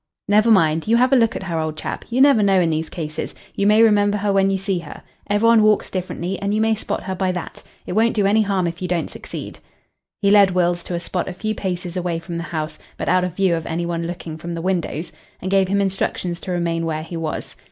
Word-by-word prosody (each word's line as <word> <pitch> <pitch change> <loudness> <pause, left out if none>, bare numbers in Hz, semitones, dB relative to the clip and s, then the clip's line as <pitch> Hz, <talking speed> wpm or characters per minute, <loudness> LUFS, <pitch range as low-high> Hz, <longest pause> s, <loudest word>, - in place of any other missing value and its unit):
"Never 210 +3 +4
mind. 160 -6 +3
You 230 +1 +4
have 255 +2 +3
a - - +7
look 230 -3 +3
at - - -4
her, 170 -4 -2
old 155 -1 -3
chap. - - -5
You 245 +2 +1
never 275 -5 +6
know 195 -2 +4
in 170 -2 +2
these 160 +1 -2
cases. 155 -2 -5 0.2
You 200 - +1
may 215 +2 +6
remember 205 -2 +4
her 205 0 0
when 195 0 +3
you 195 - +1
see 195 -1 -1
her. 165 -3 -10 0.3
Every 205 +2 +2
one 230 -1 +6
walks 215 -1 +3
differently, 185 0 -3
and 200 +1 0
you - - +1
may 220 0 +3
spot 220 - -3
her 190 - -3
by 185 0 0
that. 180 -2 -6 0.2
It - - -4
won't 225 +3 +2
do 205 -2 +2
any 210 +3 +4
harm 195 -3 0
if 170 +1 -4
you 180 - -2
don't 175 -2 -1
succeed." - - -8 0.6
He 200 -1 +2
led 200 -2 +7
Wills 175 -1 +1
to 175 - -3
a - - -1
spot 175 +1 -3
a - - -5
few 215 +4 -3
paces 180 -3 -4
away 175 -2 -1
from 170 +1 -6
the 170 - -4
house, 155 -1 -4 0.2
but - - -2
out 185 0 +3
of 180 -2 -3
view 190 -2 +2
of 165 -1 -5
any 170 +1 -2
one 170 -1 -2
looking 170 -2 -6
from 170 +1 -5
the 165 - -4
windows, 175 -3 -2 0.3
and 185 - -4
gave 195 -1 +3
him 200 +2 +1
instructions 190 -3 -1
to 185 - -6
remain 170 -1 -1
where 155 -1 -2
he 165 +2 -8
was. 165 -2 -4
185 Hz, 260 wpm, -21 LUFS, 170-205 Hz, 0.6 s, a